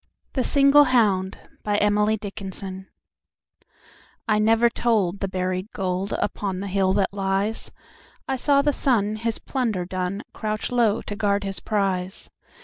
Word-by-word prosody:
The 260 - 0
Single 280 +2 +5
Hound 205 -7 +2 0.3
XLV 205 -2 -1 1.4
I 215 -1 +3
NEVER 225 +2 +4
told 205 -7 0
the 195 - -1
buried 185 +1 -2
goldUpon 190 0 -2
the 200 - -4
hill 190 -1 +1
that 195 0 0
lies,I 200 +6 -4
saw 280 +2 +3
the 290 0 +2
sun, 215 -7 +1
his 230 0 -2
plunder 225 -9 -2
done, 185 +3 -3
Crouch 215 0 -3
low 230 -3 +2
to 205 - -5
guard 205 -1 0
his 195 -1 -4
prize. 190 -3 -2
205 Hz, 125 wpm, -24 LUFS, 190-225 Hz, 1.4 s, Single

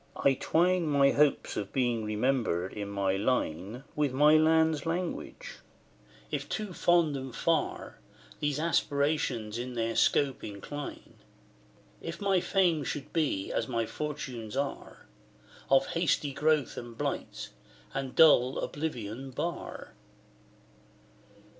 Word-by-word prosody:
I 140 - +3
twine 175 +5 +2
My 140 -2 +4
hopes 150 0 +2
of 100 -1 -4
being 120 -4 0
remembered 105 -5 0
in 100 -1 -5
my 100 -1 0
line 105 0 -1
With 150 -3 +1
my 150 +3 +6
land's 160 -1 +4
language: 175 +1 -4 0.7
if - - -3
too 210 -4 -3
fond 170 -4 +3
and 130 -2 -6
far 165 -2 -1 0.4
These 145 -1 0
aspirations 140 -8 0
in 125 0 -5
their 115 -1 -1
scope 140 -2 +2
incline, 110 +8 -7 0.8
If 165 +1 -6
my 195 -2 +2
fame 175 -5 +2
should 140 0 -5
be, 145 - 0
as - - -1
my 115 -3 -1
fortunes 130 -6 -5
are, 140 0 -4 0.6
Of 135 +5 +5
hasty 165 -5 0
growth 150 -1 +1
and 120 -1 -8
blight, - - -3 0.4
and 135 -1 -4
dull 135 -5 +6
Oblivion 135 -4 -4
bar. 170 +7 -5
140 Hz, 120 wpm, -30 LUFS, 120-155 Hz, 0.8 s, my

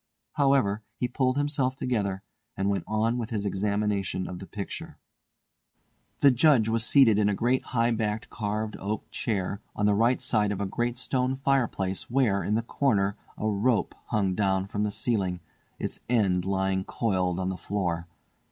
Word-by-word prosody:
However, 135 -8 +2
he 125 - -1
pulled 130 +1 0
himself 145 -3 0
together, 100 -7 -1 0.3
and 100 +1 +1
went 100 - -2
on 110 +3 +1
with 115 -1 -4
his 105 -3 -2
examination 100 -2 -1
of 90 - -6
the 95 - -9
picture. 100 -2 -6 1.2
The 140 - +7
Judge 130 -3 +4
was 115 0 +1
seated 120 -5 +5
in 105 -1 +3
a 100 - +1
great 125 +5 +1
high 115 -1 +1
backed 110 -1 -1
carved 105 0 -2
oak 105 +2 -3
chair, 100 -2 -2
on 105 - 0
the 105 - +4
right 115 +5 +3
hand - - -13
side 105 -5 +1
of 100 - -3
a 100 - 0
great 120 +5 -2
stone 130 0 0
fireplace 125 -8 0
where, 120 -6 +2
in 105 - 0
the 115 - 0
corner, 105 -6 +1 0.2
a - - -3
rope 110 +3 +1
hung 100 -3 +1
down 95 -1 +1
from 100 +1 -3
the 105 - +1
ceiling, 100 -5 -1 0.4
its - - -5
end 95 -7 +2
lying 95 0 0
coiled 95 -5 0
on 95 0 -1
the 95 - -2
floor. 90 -5 -2
105 Hz, 175 wpm, -27 LUFS, 100-120 Hz, 1.2 s, The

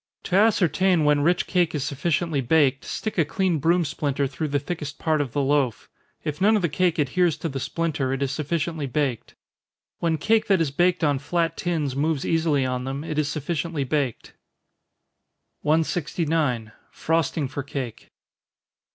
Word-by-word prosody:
To 185 - -2
ascertain 190 -4 +3
when 150 -1 +3
rich 175 +4 +2
cake 175 -4 +1
is 145 - -1
sufficiently 150 +1 -1
baked, 135 0 +2
stick 215 -4 -3
a - - +6
clean 185 0 0
broom 170 +3 +2
splinter 145 -1 -1
through 140 +4 -3
the 145 0 0
thickest 150 -1 -5
part 155 -2 +1
of 135 -5 -4
the 145 - +1
loaf 135 -4 +1 0.4
if 150 +1 -4
none 215 +3 +5
of 205 - 0
the 170 - +2
cake 175 +2 +1
adheres 160 +3 +2
to 165 - -3
the 135 -1 -4
splinter, 150 -1 -1
it 135 +1 -1
is 135 - -1
sufficiently 155 +1 -2
baked. 135 -4 -2 0.6
When 165 -2 +1
cake 220 +7 +2
that 195 -3 +4
is 160 -4 0
baked 175 +4 +2
on 145 -3 +2
flat 165 +3 -1
tins 155 -7 -2
moves 150 0 0
easily 160 -5 +2
on 125 0 -2
them, 135 +2 -4
it 155 -2 -2
is 150 -1 0
sufficiently 155 0 -2
baked. 135 -3 -2 1.3
169. 155 -6 0 0.2
_Frosting 160 -2 0
for 140 - -4
Cake. 135 -4 -6
150 Hz, 170 wpm, -24 LUFS, 140-170 Hz, 1.3 s, a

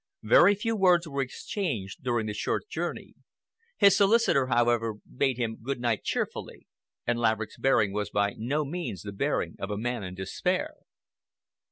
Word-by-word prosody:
Very 175 - +6
few 225 +3 -1
words 180 -4 +4
were 140 -2 -2
exchanged 130 - -4
during 120 -3 0
the 105 - -3
short 105 - -2
journey. - - -4 0.6
His 200 -2 +6
solicitor, 200 - +4
however, 120 -3 +2
bade 130 +4 -2
him 115 -2 -2
good 130 +2 -3
night 120 -4 0
cheerfully, - - -4 0.4
and 120 0 0
Laverick's 110 -1 0
bearing 110 -7 +3
was 105 0 -2
by 100 -1 +1
no 145 +7 -1
means 155 - -5
the 100 - -6
bearing 100 - -1
of 100 - -4
a 105 - -2
man 120 0 -2
in 90 -1 -6
despair. 95 0 -2
120 Hz, 160 wpm, -28 LUFS, 105-150 Hz, 0.6 s, Very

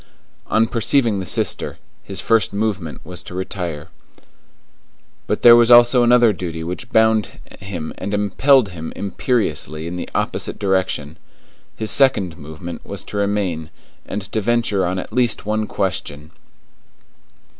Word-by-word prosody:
On 110 +1 +3
perceiving 115 -2 +1
the 95 - -5
sister, - - -1 0.2
his 95 -2 -4
first 115 -3 +2
movement 100 -6 -3
was 90 +1 -6
to 90 - -10
retire. 90 -5 -5 1.4
But - - -2
there 120 -1 +10
was 120 0 +5
also 120 +1 +7
another 120 -2 +5
duty 85 -3 -5
which 90 +8 -6
bound 110 -1 +3 0.3
him 90 -6 -6
and 100 - -4
impelled 105 +4 +3
him 80 -3 -7
imperiously 95 - -1
in 85 +1 -5
the - - -5
opposite - - -2
direction. 95 -6 -1 0.6
His 110 -1 -2
second 100 -11 +3
movement 80 +4 -8
was - - -7
to 105 - -7
remain 100 -6 -1 0.3
and 105 0 -5
to 110 - -1
venture 110 -4 +1
on 90 +1 -2
at 95 - -6
least 125 -4 +1
one 110 0 -1
question. 80 -6 -3
100 Hz, 140 wpm, -20 LUFS, 90-115 Hz, 1.4 s, there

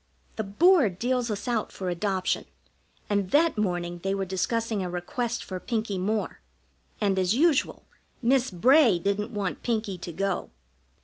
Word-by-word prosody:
The 220 - -2
Board 230 - +4
deals 245 +2 0
us 210 +3 -4
out 235 -3 -1
for 190 - -6
adoption, 185 +1 -1 0.6
and 200 -2 0
that 320 - +3
morning 175 -4 -2
they 195 +2 -1
were 195 -1 -2
discussing 215 +3 -1
a 180 - -3
request 230 +7 -3
for 185 -1 -6
Pinkie 215 -3 -2
Moore, 210 +3 -2 0.6
and, 195 -3 +1
as 185 +3 +2
usual, 305 +1 +2 0.3
Miss 255 +1 +2
Bray 240 - +5
didn't 200 +5 -1
want 205 -4 -3
Pinkie 215 -6 -2
to 170 - -6
go. 195 +2 -2
205 Hz, 150 wpm, -27 LUFS, 185-240 Hz, 0.6 s, Bray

